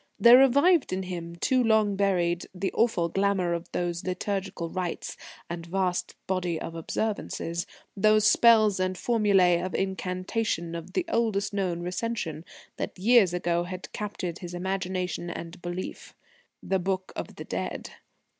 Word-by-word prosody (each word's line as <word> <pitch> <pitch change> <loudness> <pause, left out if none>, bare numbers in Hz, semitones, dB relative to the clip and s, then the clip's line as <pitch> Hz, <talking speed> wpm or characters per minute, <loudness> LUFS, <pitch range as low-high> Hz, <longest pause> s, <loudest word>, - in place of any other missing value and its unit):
There 240 +2 +9
revived 280 +6 +4
in 190 +1 -1
him, 170 -2 -6
too 255 +8 +2
long 220 -3 +3
buried, 175 -3 +1
the 190 +2 -2
awful 220 -7 +2
glamour 195 -1 +1
of 170 0 -5
those 175 -1 -2
liturgal 190 -1 -3
rites 180 -2 -3 0.3
and 170 0 -5
vast 180 +1 -1
body 180 -3 -1
of 165 - -6
observances, 170 -1 -3 0.3
those 215 +1 +4
spells 215 -4 +5
and 185 0 0
formulae 195 -7 +3
of 185 +1 -4
incantation 185 -1 -2
of 170 +2 -7
the 345 - 0
oldest 220 -8 0
known 185 -4 -1
recension 180 -3 -3 0.3
that - - -4
years 210 -1 +5
ago 175 -1 0
had 185 +1 -7
captured 185 -4 -4
his 175 -1 -7
imagination 185 -1 -2
and 170 +1 -7
belief 175 +1 -6 0.5
the 190 - 0
Book 190 +1 -2
of - - -6
the - - -8
Dead. - - -4
185 Hz, 145 wpm, -27 LUFS, 175-205 Hz, 0.5 s, There